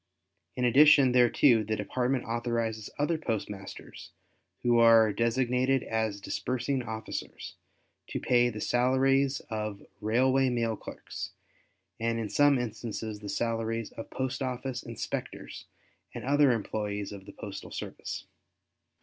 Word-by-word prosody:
In 125 Hz, -, 0 dB
addition 140 Hz, +1 st, +7 dB
thereto 120 Hz, -1 st, +5 dB
the 110 Hz, +1 st, -1 dB
Department 125 Hz, +5 st, -1 dB
authorizes 115 Hz, -2 st, -2 dB
other 155 Hz, +3 st, 0 dB
postmasters 105 Hz, -7 st, -5 dB, 0.5 s
who 120 Hz, -1 st, +4 dB
are 115 Hz, -2 st, +6 dB
designated 125 Hz, +3 st, +1 dB
as 110 Hz, -2 st, -1 dB
disbursing 130 Hz, +5 st, -2 dB
officers, 110 Hz, -2 st, -6 dB, 0.5 s
to -, -, -3 dB
pay 120 Hz, -1 st, +3 dB
the 110 Hz, -2 st, -6 dB
salaries 130 Hz, +3 st, +2 dB
of 105 Hz, -2 st, -4 dB, 0.2 s
railway 130 Hz, +5 st, +3 dB
mail 115 Hz, -2 st, 0 dB
clerks, -, -, -8 dB, 0.7 s
and 115 Hz, 0 st, 0 dB
in 110 Hz, -2 st, -3 dB
some 145 Hz, +2 st, +4 dB
instances 110 Hz, -2 st, -4 dB
the 105 Hz, -1 st, -8 dB
salaries 115 Hz, +1 st, -2 dB
of 115 Hz, -, -8 dB
postoffice 130 Hz, -1 st, -3 dB
inspectors 115 Hz, -2 st, -6 dB, 0.5 s
and -, -, -5 dB
other 145 Hz, 0 st, +4 dB
employes 105 Hz, -2 st, -2 dB
of 100 Hz, -1 st, -10 dB
the 100 Hz, -, -10 dB
postal 100 Hz, -3 st, -8 dB
service. -, -, -6 dB
115 Hz, 120 wpm, -29 LUFS, 110-130 Hz, 0.7 s, addition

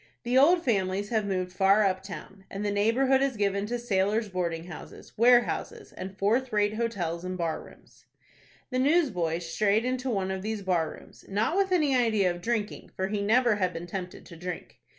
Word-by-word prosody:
The 240 Hz, +2 st, -1 dB
old 335 Hz, +6 st, +5 dB
families 200 Hz, -3 st, 0 dB
have 220 Hz, -3 st, 0 dB
moved 185 Hz, -2 st, -2 dB
far 195 Hz, +3 st, +4 dB
up 190 Hz, -1 st, +1 dB
town, 195 Hz, 0 st, -10 dB
and 200 Hz, +2 st, -4 dB
the 205 Hz, -, 0 dB
neighborhood 250 Hz, +6 st, +3 dB
is 275 Hz, -4 st, 0 dB
given 200 Hz, 0 st, 0 dB
to 245 Hz, +2 st, -2 dB
sailors' 215 Hz, -1 st, 0 dB
boarding 170 Hz, -3 st, -2 dB
houses, 170 Hz, -3 st, -11 dB
warehouses, 240 Hz, +1 st, +2 dB
and 190 Hz, +1 st, -8 dB
fourth 240 Hz, +6 st, +1 dB
rate 210 Hz, 0 st, +2 dB
hotels 195 Hz, -7 st, -2 dB
and 185 Hz, 0 st, -4 dB
bar 165 Hz, -2 st, -2 dB
rooms. -, -, -19 dB, 0.7 s
The 255 Hz, -, 0 dB
newsboy 255 Hz, -, +2 dB
strayed 200 Hz, +6 st, +1 dB
into 255 Hz, +1 st, -1 dB
one 195 Hz, -5 st, -1 dB
of 190 Hz, 0 st, -3 dB
these 215 Hz, 0 st, -4 dB
bar 175 Hz, -4 st, +1 dB
rooms, -, -, -14 dB
not 215 Hz, -, 0 dB
with 390 Hz, -1 st, +1 dB
any 300 Hz, -7 st, +3 dB
idea 220 Hz, -7 st, +2 dB
of 175 Hz, 0 st, -7 dB
drinking, 220 Hz, 0 st, -2 dB
for 190 Hz, 0 st, -2 dB
he 210 Hz, 0 st, -1 dB
never 230 Hz, +1 st, +3 dB
had 185 Hz, -2 st, 0 dB
been 165 Hz, -, -6 dB
tempted 180 Hz, 0 st, -6 dB
to 170 Hz, -, -12 dB
drink. 175 Hz, +1 st, -7 dB
205 Hz, 190 wpm, -28 LUFS, 185-235 Hz, 0.7 s, old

